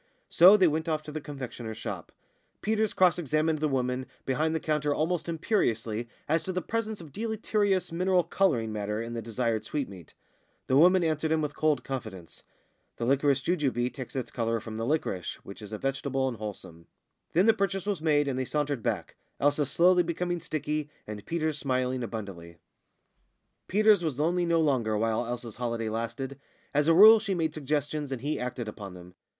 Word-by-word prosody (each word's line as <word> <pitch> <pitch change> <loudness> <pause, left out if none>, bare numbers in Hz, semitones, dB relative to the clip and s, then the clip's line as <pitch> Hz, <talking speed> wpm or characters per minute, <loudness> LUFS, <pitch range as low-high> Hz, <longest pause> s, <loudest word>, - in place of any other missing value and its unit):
So 185 +5 +8
they 185 -3 +5
went 160 +1 -1
off 155 -1 -1
to 150 - -8
the 155 0 -5
confectioner's 125 -6 -7
shop. - - -6 0.5
Peters 220 -1 +1
cross 180 -2 +3
examined 155 0 +1
the 155 - +1
woman 130 -1 -1 0.2
behind 155 +4 0
the - - +1
counter 150 -2 0
almost 170 +2 -1
imperiously 120 - -1 0.2
as 160 +2 +2
to 190 - -4
the 185 -1 -2
presence 220 -1 -3
of 155 -4 -11
deleterious 210 -1 0
mineral 180 +1 +2
colouring 140 - +1
matter 105 0 -2
in 115 +1 -5
the 115 - -3
desired 115 0 -1
sweetmeat. 105 - -5 0.5
The 130 - +1
woman 180 +5 +6
answered 160 -1 0
him 160 - +3
with 145 -1 -3
cold 150 -5 +1
confidence: 110 -10 -7 0.5
"The 115 - -2
liquorice 140 +1 +2
jujube 130 -8 0
takes 130 +1 -8
its 130 - -3
colour 115 -1 -1
from 110 0 -8
the 115 +1 -3
liquorice, 125 - -1
which 100 - -10
is 105 -1 -9
a 110 - -3
vegetable 135 +1 -1
and 120 -3 -3
wholesome." 95 -6 -8 0.5
Then 180 +4 +4
the 225 - +6
purchase 195 -3 -1
was 200 -6 -2
made, 145 -2 +2
and 130 -2 -1
they - - 0
sauntered 145 -2 -1
back - - -3 0.2
Elsa 145 0 +2
slowly 180 +5 +4
becoming 175 0 -2
sticky, 150 0 -3 0.2
and 105 -1 -7
Peters 155 -3 -1
smiling 130 -2 -1
abundantly. 100 -8 -7 1.1
Peters 210 -1 +4
was 155 -6 -2
lonely 175 +3 +1
no 165 -1 +3
longer 120 -8 +1
while 115 +2 0
Elsa's 120 -2 -5
holiday 115 -2 -2
lasted. 115 +5 -4 0.3
As 145 +1 +2
a 165 - +6
rule 215 +4 +10
she 205 -3 -2
made 160 -3 0
suggestions, 145 0 -2
and 130 -3 -3
he 150 +3 -2
acted 125 -2 -4
upon 100 -3 -8
them. 90 0 -12
145 Hz, 185 wpm, -28 LUFS, 115-165 Hz, 1.1 s, rule